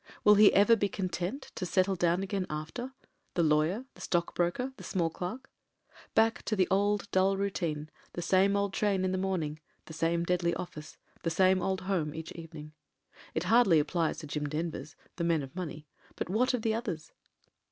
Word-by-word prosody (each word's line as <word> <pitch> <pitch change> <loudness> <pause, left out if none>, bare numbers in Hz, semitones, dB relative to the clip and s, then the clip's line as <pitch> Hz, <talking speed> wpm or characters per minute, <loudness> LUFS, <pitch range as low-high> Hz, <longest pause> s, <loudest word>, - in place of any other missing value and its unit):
Will 210 - +8
he 210 0 +7
ever 205 +4 +6
be 205 -2 0
content 185 - -4
to - - -5
settle 185 +2 +2
down 175 +1 +1
again 195 -1 -2
after 160 +13 -5 0.2
— 290 0 -45
^the 170 -2 +3
lawyer, 155 +11 +2
the - - -15
stock 170 -1 0
broker, 215 +10 -1
the - - -10
small 170 -4 0
clerk? 230 +12 -6 0.6
Back 225 +1 +3
to 215 - 0
the 185 -3 +3
old 205 +1 +1
dull 190 +1 +3
routine, 170 -6 -2 0.3
the 175 - -4
same 195 +3 +3
old 200 -1 0
train 195 -3 +1
in 185 - 0
the 185 - -1
morning, 170 -6 -2 0.3
the 160 - -10
same 165 +1 +1
deadly 170 -1 +1
office, 155 -4 -7 0.2
the 165 - 0
same 185 +3 +4
cJd 190 +1 -1
home 180 -6 -1
each 160 0 -6
evening. 160 -2 -9 0.6
It 160 - 0
hardly 195 -4 +5
ap 150 - -1
plies 170 -3 0
to 155 - -7
the 145 - -11
Jim 150 -1 -2
Denvers 155 -2 -4
— - - -33
^the 170 - -1
men 165 -4 +2
of 135 +2 -10
money: 155 -4 -5 0.3
but - - -4
what 250 +6 +2
of 230 - -4
the 225 - +2
others 200 -10 -4
180 Hz, 205 wpm, -30 LUFS, 165-200 Hz, 0.6 s, Will